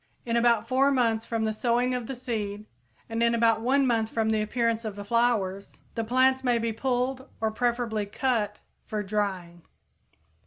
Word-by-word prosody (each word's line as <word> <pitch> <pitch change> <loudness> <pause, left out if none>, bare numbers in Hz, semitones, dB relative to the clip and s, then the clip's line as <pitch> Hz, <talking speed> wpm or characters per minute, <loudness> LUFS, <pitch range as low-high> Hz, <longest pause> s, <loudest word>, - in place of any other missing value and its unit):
In 235 -1 -1
about 235 -1 +3
four 265 +2 +3
months 230 -4 +1
from 230 -1 -1
the 220 - 0
sowing 245 +2 +1
of 245 -2 -3
the 270 - -4
seed, 215 -4 -4 0.4
and 225 0 -3
in 235 0 +3
about 230 -1 +3
one 270 +4 +3
month 225 -3 +1
from 225 -1 0
the 215 -1 +1
appearance 230 +1 0
of 215 -3 -5
the 205 0 -7
flowers, 205 -4 0
the 230 - -2
plants 260 +3 +3
may 245 -2 +2
be 230 -1 -1
pulled, 260 +2 -1
or 220 -1 0
preferably 230 -2 -1
cut, 215 -2 -1 0.3
for 210 -1 -2
drying. 190 -4 -3
230 Hz, 180 wpm, -27 LUFS, 215-245 Hz, 0.4 s, about